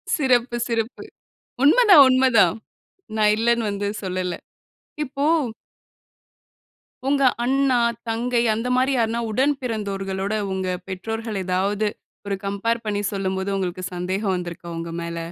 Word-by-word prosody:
சிறப்பு, 245 -5 +2
சிறப்பு. 230 0 -3 0.6
உண்மதான், 370 - +8
உண்மதான். 245 -8 +4 0.6
நான் 210 -1 +4
இல்லன்னு 235 -1 +1
வந்து 200 0 -2 0.2
சொல்லல. 185 -1 -2 0.7
இப்போ 275 +2 -3 1.8
உங்க 280 0 +2 0.2
அண்ணா, 265 0 +2 0.3
தங்கை 235 +1 0
அந்த 230 +3 -3
மாரி 260 +2 +2
யாருன்னா 230 0 0
உடன் 270 +6 +2
பிறந்தோர்களோட, 195 -4 -3 0.2
உங்க 190 0 -2 0.2
பெற்றோர்கள் 220 +2 -4
ஏதாவது 195 +3 0 0.4
ஒரு 200 - -1
கம்பேர் 230 +4 -1
பண்ணி 205 -1 -1
சொல்லும்போது, 190 0 -2
உங்களுக்கு 185 -1 -3
சந்தேகம் 185 +2 -1
வந்திருக்கா 175 -1 -7
உங்க 165 0 -5
மேல? 170 0 -5
215 Hz, 115 wpm, -23 LUFS, 190-245 Hz, 1.8 s, உண்மதான்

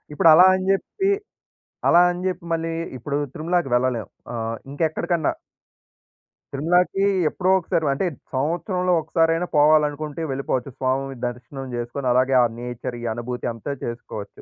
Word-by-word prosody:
ఇప్పుడు 165 - +5
అలా 180 +4 +8
అని 185 - -3
చెప్పి, 385 - -1 0.8
అలా 175 - +7
అని 175 +1 -6
చెప్పి 180 -2 -5
మళ్ళీ 165 0 -2 0.3
ఇప్పుడు 140 +4 -3 0.2
తిరుమలాకి 170 -1 0
వెళ్ళలేము. 125 -3 0 0.3
ఆహ్, 115 0 -3 0.2
ఇంకా 145 - -4
ఎక్కడికన్నా. 170 +1 0 1.2
తిరుమలాకి 180 +7 +2 0.2
ఎప్పుడో 185 +4 -1
ఒకసారి 165 -2 -1
అంటే 140 +8 -1 0.3
సంవత్సరంలో 175 +6 0
ఒక్కసారైనా 165 +2 +1
పోవాలనుకుంటే 150 0 +3
వెళ్ళిపోవచ్చు. 135 -1 -2
స్వామి 135 +1 -1
దర్శనం 125 +3 -7
చేసుకొని 120 +3 -4
అలాగే 130 +2 +3
ఆ - - +5
నేచర్ 125 +1 -5
ఈ - - -8
అనుభూతి 120 +2 -5
అంతా 115 +5 -6
చేసుకోవచ్చు. 115 -3 -7
145 Hz, 135 wpm, -23 LUFS, 125-170 Hz, 1.2 s, అలా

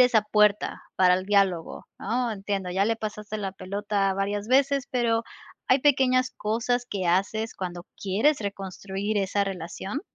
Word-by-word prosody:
esa 245 -4 +5
puerta 210 -1 +2
para 180 -1 +5
el 185 +1 -2
diálogo, 195 -5 +1
¿no?, 240 +3 -1
entiendo, 195 -3 -3
ya 190 +2 +2
le 225 +2 +2
pasaste 210 -1 -5
la 195 -2 -3
pelota 200 0 -1
varias 200 +1 -2
veces, 275 +2 +3
pero, 230 -2 +1 0.4
¿hay 260 +1 +4
pequeñas 255 -2 +3
cosas 235 +3 -1
que 195 -6 -3
haces 205 +5 0
cuando 175 -2 -5 0.2
quieres 220 +10 +2
reconstruir 200 0 -3
esa 200 +1 +1
relación? 195 - -4
205 Hz, 150 wpm, -26 LUFS, 195-230 Hz, 0.4 s, esa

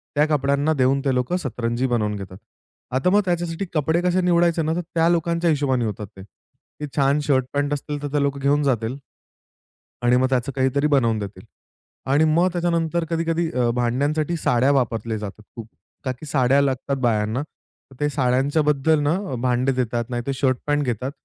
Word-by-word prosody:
त्या 150 - +4
कपड्यांना 145 +1 +1
देऊन, 135 -1 +2
ते 135 - +2
लोकं 125 +9 0
सतरंजी 120 -4 -2
बनवून 105 -4 0
घेतात. 95 -2 -8 0.6
आता 135 +8 +2
मग 205 +2 +4
त्याच्यासाठी 175 +1 -2
कपडे 160 +2 +1
कसे 180 +1 +1
निवडायचे 170 -1 +2
ना, 160 +1 0
तर 175 - -1
त्या 165 0 +3
लोकांच्या 170 0 +1
हिशोबाने 135 -5 +1
होतात 105 -1 -4
ते. 95 - -9
ते 125 +8 -13
छान 140 0 +3
शर्ट-पॅन्ट 140 +1 0
असतील, 145 0 -4
तर - - -1
ते 145 - +2
लोकं 140 0 -1
घेऊन 145 +2 +2
जातील 125 -2 0 1.1
आणि 120 +1 +4
मग 130 +1 +2
त्याचं 130 0 0
काहीतरी 135 +2 +1
बनवून 115 -7 +2
देतील. 100 -2 -7 0.7
आणि 145 +3 +4
मग 165 +3 +3
त्याच्यानंतर 170 -1 0
कधी-कधी 165 0 0
अ, 125 -1 +1
भांड्यांसाठी 145 +7 0
साड्या 130 -1 +2
वापरल्या 115 -4 0
जातात 105 0 -8
खूप. 115 -2 -8 0.4
का 130 - 0
की 130 +5 -9
साड्या 135 -1 +2
लागतात 135 0 -1
बायांना, 110 0 +1
तर 135 -2 -23
ते 150 0 +1
साड्यांच्या 135 +2 +1
बद्दल 150 +1 +2
ना, 145 +4 +1 0.2
भांडे 125 +1 +1
देतात, 120 -2 -1
नाहीतर 120 +2 -3
शर्ट-पॅन्ट 140 +2 0
घेतात, 125 +2 -2
140 Hz, 170 wpm, -22 LUFS, 125-155 Hz, 1.1 s, त्या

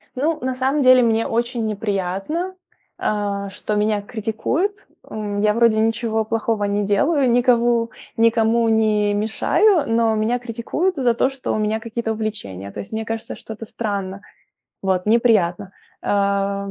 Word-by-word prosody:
Ну, 305 +5 0
на 260 +1 -1
самом 270 +3 0
деле 255 0 +7
мне 225 -1 +2
очень 235 0 -1
неприятно, 210 - -2 0.4
а, 200 -1 -2
что 210 +2 -4
меня 210 0 +1
критикуют. 245 - -2 0.2
Э, 205 -1 -4
я 210 0 +3
вроде 230 -1 +3
ничего 225 0 0
плохого 220 -1 -1
не 205 +1 0
делаю, 265 +7 +2
никому, 240 -1 +3 0.3
никому 230 0 +3
не 215 -2 +2
мешаю, 280 - +2
но 225 -1 +2
меня 220 +3 +1
критикуют 245 +10 -2
за 250 -3 +2
то, 260 - +2
что 270 -1 -5
у - - 0
меня 215 +1 0
какие-то 230 0 -3
увлечения, 100 - -5
то - - -8
есть - - -8
мне 220 0 -3
кажется, 225 0 -5
что 220 - -9
это 220 +1 -9
странно. 200 -3 -4 0.6
Вот, 190 0 0
неприятно. 210 -5 +2 0.3
А. 200 0 0
220 Hz, 150 wpm, -21 LUFS, 205-240 Hz, 0.6 s, деле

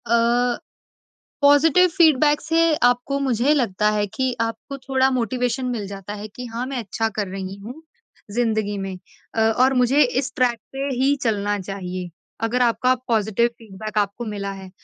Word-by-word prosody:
अ, 235 +1 +2 0.9
positive 300 +5 +5
feedback 305 -4 +4
से 330 0 +2
आपको 245 +3 +2
मुझे 260 +1 +2
लगता 210 -6 +1
है 210 -1 0
कि 260 +5 -2
आपको 230 +4 -3
थोड़ा 265 0 +1
मोटिवेशन 250 +1 -1
मिल 235 -5 -3
जाता 200 0 -7
है 210 0 -7
कि 250 +4 -9
हाँ, 235 +1 -4
मैं 270 -1 -4
अच्छा 225 0 -2
कर 210 -2 -1
रही 190 0 -5
हूँ 240 +10 -10 0.5
ज़िंदगी 220 -2 0
में। 195 -1 -4 0.4
अ, 225 - 0
और 245 +4 +3
मुझे 255 +3 +4
इस 260 0 0
ट्रैक 245 -2 +2
पे 270 +1 -3
ही 270 +3 +3
चलना 205 -3 0
चाहिए, 185 -1 -5 0.3
अगर 230 +3 +1
आपका 250 +2 +3
पॉज़िटिव 220 0 +2
फीडबैक 215 0 -6
आपको 205 +3 -1
मिला 200 -2 -4
है। 190 -1 -10
235 Hz, 160 wpm, -22 LUFS, 205-260 Hz, 0.9 s, पॉज़िटिव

